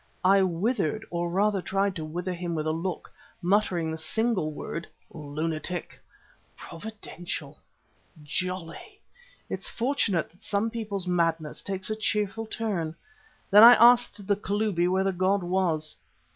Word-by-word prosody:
I 195 Hz, +1 st, +6 dB
withered, 190 Hz, +2 st, 0 dB
or 175 Hz, 0 st, -1 dB
rather 200 Hz, +2 st, +1 dB
tried 195 Hz, +1 st, 0 dB
to 160 Hz, -, -4 dB
wither 175 Hz, +4 st, -4 dB
him 175 Hz, -1 st, -4 dB
with 155 Hz, -1 st, -2 dB
a 155 Hz, -, +1 dB
look, 165 Hz, +2 st, -4 dB, 0.3 s
muttering 180 Hz, -3 st, +1 dB
the 160 Hz, -, -5 dB
single 190 Hz, 0 st, 0 dB
word: 165 Hz, +3 st, -6 dB, 0.2 s
"Lunatic." 155 Hz, +3 st, -4 dB, 0.6 s
Providential! 170 Hz, -6 st, -7 dB, 0.6 s
Jolly! 180 Hz, +4 st, -2 dB, 0.8 s
Well, -, -, -18 dB
it's -, -, -3 dB
fortunate 230 Hz, -, 0 dB
that 175 Hz, -, -26 dB
some 210 Hz, +3 st, -1 dB
people's 210 Hz, -5 st, -3 dB
madness 165 Hz, -3 st, 0 dB
takes 190 Hz, +1 st, -4 dB
a -, -, 0 dB
cheerful 215 Hz, 0 st, -1 dB
turn. 195 Hz, -9 st, -2 dB, 0.6 s
Then 205 Hz, +2 st, +9 dB
I 235 Hz, +2 st, +12 dB
asked 235 Hz, -3 st, +5 dB
the 205 Hz, +1 st, +2 dB
Kalubi 200 Hz, -3 st, 0 dB
where 190 Hz, +1 st, +2 dB
the 195 Hz, -, +1 dB
god 185 Hz, +2 st, +1 dB
was. 175 Hz, -4 st, 0 dB
185 Hz, 140 wpm, -27 LUFS, 165-210 Hz, 0.8 s, I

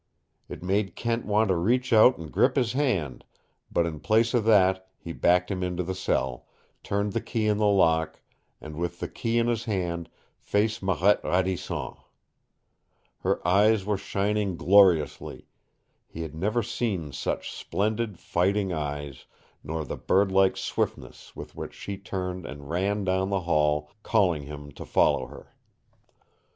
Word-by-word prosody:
It -, -, -8 dB
made 95 Hz, 0 st, 0 dB
Kent 115 Hz, -1 st, -2 dB
want 105 Hz, 0 st, +2 dB
to 95 Hz, -, +3 dB
reach 120 Hz, +9 st, +1 dB
out 115 Hz, +3 st, +7 dB
and 80 Hz, -2 st, -9 dB
grip 130 Hz, 0 st, +3 dB
his 125 Hz, -4 st, +1 dB
hand, 105 Hz, -, -1 dB, 0.5 s
but 85 Hz, -, +2 dB
in 80 Hz, -3 st, -4 dB
place 115 Hz, +5 st, +2 dB
of 120 Hz, -3 st, +1 dB
that 95 Hz, -3 st, +3 dB
he 85 Hz, -, -8 dB
backed 90 Hz, +3 st, +2 dB
him 95 Hz, -1 st, -2 dB
into 90 Hz, 0 st, -2 dB
the 95 Hz, +2 st, -3 dB
cell, 65 Hz, -9 st, -2 dB, 0.3 s
turned 100 Hz, 0 st, -2 dB
the -, -, -1 dB
key 110 Hz, -2 st, -2 dB
in 105 Hz, -1 st, +2 dB
the 105 Hz, -, +3 dB
lock, 80 Hz, -5 st, +2 dB, 0.4 s
and 75 Hz, 0 st, -9 dB
with 85 Hz, 0 st, -3 dB
the -, -, -3 dB
key 115 Hz, 0 st, -2 dB
in 115 Hz, -, +3 dB
his 115 Hz, -1 st, -1 dB
hand 85 Hz, -5 st, -2 dB, 0.3 s
faced 105 Hz, +2 st, 0 dB
Marette 95 Hz, +1 st, +2 dB
Radisson. 95 Hz, 0 st, -1 dB, 1.3 s
Her -, -, -1 dB
eyes 100 Hz, +2 st, +4 dB
were 105 Hz, 0 st, +1 dB
shining 100 Hz, -1 st, -1 dB
gloriously. 90 Hz, -4 st, +3 dB, 0.6 s
He 80 Hz, -, -7 dB
had 80 Hz, -, -7 dB
never 105 Hz, +8 st, 0 dB
seen 105 Hz, -9 st, -3 dB
such 75 Hz, -, -3 dB
splendid, 105 Hz, -1 st, -2 dB
fighting 95 Hz, +3 st, 0 dB
eyes, 75 Hz, -3 st, -5 dB, 0.4 s
nor 80 Hz, +1 st, -4 dB
the -, -, -5 dB
birdlike 95 Hz, 0 st, +2 dB
swiftness -, -, -4 dB
with -, -, -9 dB
which -, -, -7 dB
she 100 Hz, -1 st, -6 dB
turned 90 Hz, -2 st, -5 dB
and 70 Hz, -1 st, -9 dB
ran 100 Hz, +4 st, 0 dB
down 95 Hz, 0 st, 0 dB
the 100 Hz, -1 st, 0 dB
hall, 75 Hz, -2 st, +1 dB
calling 95 Hz, -9 st, +2 dB
him 75 Hz, -1 st, -9 dB
to -, -, -9 dB
follow -, -, +2 dB
her. -, -, -14 dB
95 Hz, 155 wpm, -26 LUFS, 85-105 Hz, 1.3 s, out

